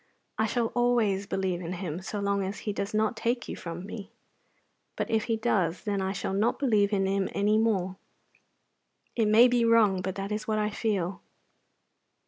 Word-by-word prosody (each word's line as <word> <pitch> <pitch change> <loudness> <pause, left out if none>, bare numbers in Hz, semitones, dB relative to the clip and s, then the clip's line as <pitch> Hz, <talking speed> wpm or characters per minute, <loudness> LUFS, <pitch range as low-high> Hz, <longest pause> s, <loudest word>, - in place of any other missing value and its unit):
I 220 - +3
shall 230 0 0
always 230 -5 +2
believe 185 -3 -1
in 175 +1 -4
Him 175 -2 -4
so 205 +2 -4
long 200 0 0
as 195 +2 -5
He 210 - -1
does 200 +1 -3
not 215 +2 +1
take 235 +2 -1
you - - -5
from 170 +1 -7
me. 210 -1 -8 0.9
But - - -3
if 220 -1 +1
He 225 -2 0
does, 195 -7 0
then 200 -2 -1
I 190 0 -1
shall 190 0 -3
not 210 +4 +1
believe 215 -7 +2
in 195 -2 +1
Him 195 0 0
any 210 +2 +2
more. 190 -5 0 1.2
It 225 -3 +2
may 225 +4 +7
be 245 -1 +2
wrong, 220 -5 +4
but 190 +1 -3
that 195 +1 -4
is 210 +1 -3
what 215 -1 0
I 210 0 0
feel. 200 -4 -2
205 Hz, 190 wpm, -28 LUFS, 190-220 Hz, 1.2 s, may